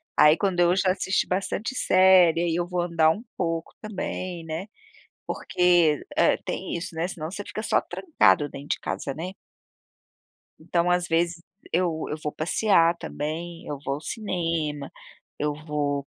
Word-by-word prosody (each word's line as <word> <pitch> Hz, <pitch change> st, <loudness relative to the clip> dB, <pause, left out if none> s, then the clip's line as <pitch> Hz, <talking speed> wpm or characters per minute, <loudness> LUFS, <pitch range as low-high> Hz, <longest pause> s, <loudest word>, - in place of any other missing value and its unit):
aí 150 Hz, +1 st, +6 dB
quando 190 Hz, -3 st, +1 dB
eu 175 Hz, 0 st, +5 dB
já 190 Hz, -1 st, +2 dB
assisti 190 Hz, 0 st, 0 dB
bastante 200 Hz, +6 st, -2 dB
série, 185 Hz, -5 st, +5 dB
ai 170 Hz, -2 st, 0 dB
eu 175 Hz, 0 st, 0 dB
vou 180 Hz, 0 st, -3 dB
andar 165 Hz, -2 st, +3 dB
um 205 Hz, +7 st, 0 dB
pouco 165 Hz, -2 st, -2 dB
também, 185 Hz, -4 st, -5 dB
né, 165 Hz, +5 st, -5 dB, 0.6 s
porque 175 Hz, -4 st, +2 dB, 0.4 s
tem -, -, -3 dB
isso, 170 Hz, 0 st, -6 dB
né, 165 Hz, +3 st, -1 dB
senão 160 Hz, -2 st, -5 dB
você 205 Hz, +1 st, -5 dB
fica 215 Hz, -, -5 dB
só -, -, +2 dB
trancado 300 Hz, -, +2 dB
dentro 140 Hz, 0 st, -10 dB
de -, -, -24 dB
casa, 135 Hz, -, -4 dB
né? 175 Hz, +5 st, -5 dB, 1.3 s
Então 170 Hz, +2 st, 0 dB
às 180 Hz, 0 st, +1 dB
vezes 170 Hz, +1 st, 0 dB, 0.3 s
eu 170 Hz, -2 st, 0 dB
eu 150 Hz, -, -3 dB
vou 150 Hz, -, -1 dB
passear 170 Hz, 0 st, +3 dB
também, 165 Hz, +3 st, -5 dB
eu 145 Hz, -, -4 dB
vou 135 Hz, +1 st, -1 dB
ao 150 Hz, -, -8 dB
cinema, 165 Hz, -8 st, -3 dB, 0.5 s
eu 150 Hz, 0 st, 0 dB
vou 145 Hz, -2 st, -1 dB
170 Hz, 155 wpm, -25 LUFS, 155-185 Hz, 1.3 s, aí